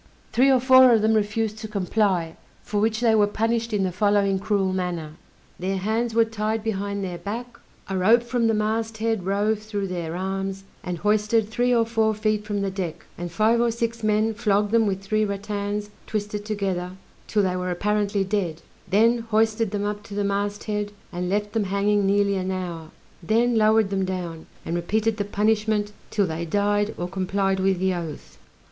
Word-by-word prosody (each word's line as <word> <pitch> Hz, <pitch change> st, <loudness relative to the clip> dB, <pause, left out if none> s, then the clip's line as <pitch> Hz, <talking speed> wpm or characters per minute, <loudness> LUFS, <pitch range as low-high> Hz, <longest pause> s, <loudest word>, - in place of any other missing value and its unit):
Three 255 Hz, +5 st, +5 dB
or 260 Hz, -1 st, +5 dB
four 260 Hz, 0 st, +7 dB
of 220 Hz, -2 st, +4 dB
them 220 Hz, +1 st, +4 dB
refused 215 Hz, 0 st, 0 dB
to 220 Hz, -, -6 dB
comply, 195 Hz, -4 st, 0 dB, 0.3 s
for 205 Hz, -, -2 dB
which 220 Hz, +1 st, +1 dB
they 230 Hz, -2 st, +4 dB
were 210 Hz, -2 st, +4 dB
punished 230 Hz, +2 st, -1 dB
in 205 Hz, -2 st, +1 dB
the 185 Hz, -, 0 dB
following 200 Hz, +1 st, +2 dB
cruel 195 Hz, -1 st, 0 dB
manner: 175 Hz, -4 st, -3 dB, 0.5 s
their 190 Hz, +2 st, -1 dB
hands 220 Hz, +4 st, -1 dB
were 230 Hz, 0 st, +5 dB
tied 220 Hz, 0 st, -2 dB
behind 200 Hz, -2 st, -2 dB
their 180 Hz, -2 st, -4 dB
back, 235 Hz, +4 st, -6 dB, 0.3 s
a 195 Hz, -, -3 dB
rope 220 Hz, +6 st, +4 dB
from 240 Hz, -1 st, 0 dB
the 225 Hz, -, +2 dB
mast 220 Hz, +1 st, -1 dB
head 220 Hz, -4 st, -1 dB
rove 205 Hz, +2 st, +1 dB
through 205 Hz, -2 st, -4 dB
their 170 Hz, -2 st, -4 dB
arms, 195 Hz, +1 st, -3 dB, 0.2 s
and 180 Hz, -2 st, -3 dB
hoisted 210 Hz, +3 st, +2 dB
three 245 Hz, +2 st, +1 dB
or 230 Hz, -2 st, +4 dB
four 220 Hz, -1 st, +1 dB
feet 215 Hz, 0 st, 0 dB
from 205 Hz, -1 st, -2 dB
the 195 Hz, -, -1 dB
deck, 185 Hz, -4 st, -5 dB
and 175 Hz, 0 st, -6 dB
five 220 Hz, +5 st, +3 dB
or 240 Hz, -, +3 dB
six 230 Hz, 0 st, -2 dB
men 215 Hz, +1 st, +2 dB
flogged 210 Hz, -2 st, +1 dB
them 225 Hz, -1 st, +4 dB
with 195 Hz, -1 st, -1 dB
three 215 Hz, +2 st, +1 dB
rattans 205 Hz, 0 st, -3 dB, 0.2 s
twisted 210 Hz, -1 st, -3 dB
together 190 Hz, -4 st, -2 dB, 0.3 s
'till 210 Hz, -2 st, +2 dB
they 185 Hz, -1 st, 0 dB
were 180 Hz, 0 st, -2 dB
apparently 205 Hz, +2 st, 0 dB
dead; 185 Hz, -5 st, -2 dB, 0.3 s
then 230 Hz, +4 st, +4 dB
hoisted 220 Hz, 0 st, +2 dB
them 205 Hz, 0 st, -2 dB
up 205 Hz, 0 st, -3 dB
to 205 Hz, -1 st, -10 dB
the 205 Hz, -, 0 dB
mast 200 Hz, +1 st, -1 dB
head, 210 Hz, -1 st, -2 dB, 0.2 s
and 180 Hz, +1 st, -2 dB
left 205 Hz, +1 st, -1 dB
them 220 Hz, -3 st, +1 dB
hanging 200 Hz, +1 st, +1 dB
nearly 200 Hz, 0 st, +2 dB
an 185 Hz, 0 st, -2 dB
hour, 175 Hz, -4 st, -4 dB, 0.3 s
then 230 Hz, +6 st, +2 dB
lowered 215 Hz, -2 st, +4 dB
them 195 Hz, -1 st, 0 dB
down, 180 Hz, -3 st, -4 dB, 0.2 s
and 165 Hz, -, -2 dB
repeated 215 Hz, +5 st, 0 dB
the 205 Hz, -, 0 dB
punishment, 210 Hz, 0 st, +1 dB, 0.2 s
'till 205 Hz, -2 st, +1 dB
they 165 Hz, -1 st, -3 dB
died 205 Hz, +4 st, 0 dB
or 175 Hz, -, -3 dB
complied 190 Hz, +1 st, 0 dB
with 190 Hz, 0 st, +2 dB
the 190 Hz, +1 st, +1 dB
oath. 165 Hz, -4 st, -7 dB
205 Hz, 190 wpm, -24 LUFS, 190-220 Hz, 0.5 s, four